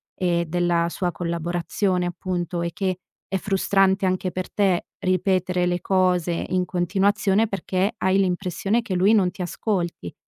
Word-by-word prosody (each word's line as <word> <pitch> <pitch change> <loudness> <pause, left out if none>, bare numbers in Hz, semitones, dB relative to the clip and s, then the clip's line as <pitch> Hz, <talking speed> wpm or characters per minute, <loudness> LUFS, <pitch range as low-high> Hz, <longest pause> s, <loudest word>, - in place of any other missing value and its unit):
e 170 -2 0
della 175 0 +1
sua 175 0 -2
collaborazione 175 +2 -1
appunto, 175 -1 -3
e 170 0 -2
che 185 -1 -1 0.3
è 195 - -1
frustrante 195 0 +2
anche 185 0 0
per 185 0 -5
te 195 -4 +1
ripetere 185 -1 +1
le 175 0 0
cose 180 -3 +1
in 185 0 +1
continuazione 195 +4 +1
perché 195 0 -1
hai 190 +1 +2
l'impressione 195 +4 0
che 205 - -4
lui 190 +4 +4
non 185 -4 +3
ti 185 - -9
ascolti, 175 - -3
185 Hz, 145 wpm, -23 LUFS, 175-195 Hz, 0.3 s, lui